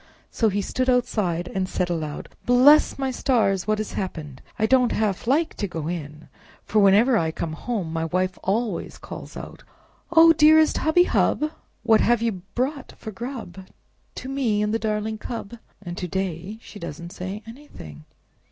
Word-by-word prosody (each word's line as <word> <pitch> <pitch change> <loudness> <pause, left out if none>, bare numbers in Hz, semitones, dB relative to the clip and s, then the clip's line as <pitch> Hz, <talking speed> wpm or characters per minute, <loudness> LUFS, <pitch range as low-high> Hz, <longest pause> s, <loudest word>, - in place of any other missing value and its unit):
So 225 - +2
he 200 0 -1
stood 255 +5 -1
outside, 195 -9 0
and 185 -1 -1
said 180 - -1
aloud, 155 -3 -4 0.2
"Bless 260 +5 +6
my 270 -1 -1
stars! 220 -8 +1
What 215 0 +2
has 215 0 -4
happened? 155 -8 -5 0.2
I 220 - +2
don't 250 +1 +3
half 215 -1 -1
like 305 +6 +2
to 205 - -2
go 165 -4 -5
in, 155 -3 -6 0.4
for 215 - +1
whenever 210 +5 +5
I 160 - 0
come 160 0 -4
home 185 -3 -4
my 165 0 -1
wife 185 +3 -1
always 210 -1 -2
calls - - -9
out, - - -9 0.5
'Oh, 330 0 +7
dearest 315 0 +5
hubby 315 +3 +4
hub! 305 -3 +1 0.3
What 220 -1 +4
have 235 -1 +2
you 215 -6 -1
brought 270 +3 -2
for 220 - -7
grub 220 -5 -7 0.5
to 255 - -7
me 245 -6 0
and 210 +1 -1
the 225 - +1
darling 215 0 -2
cub?' 230 0 -7 0.2
and 175 -2 -6
to 180 - -3
day 190 +2 -4
she 205 - -11
doesn't 170 0 -7
say 195 +3 -6
anything!" 225 - -12
210 Hz, 170 wpm, -24 LUFS, 180-250 Hz, 0.5 s, Oh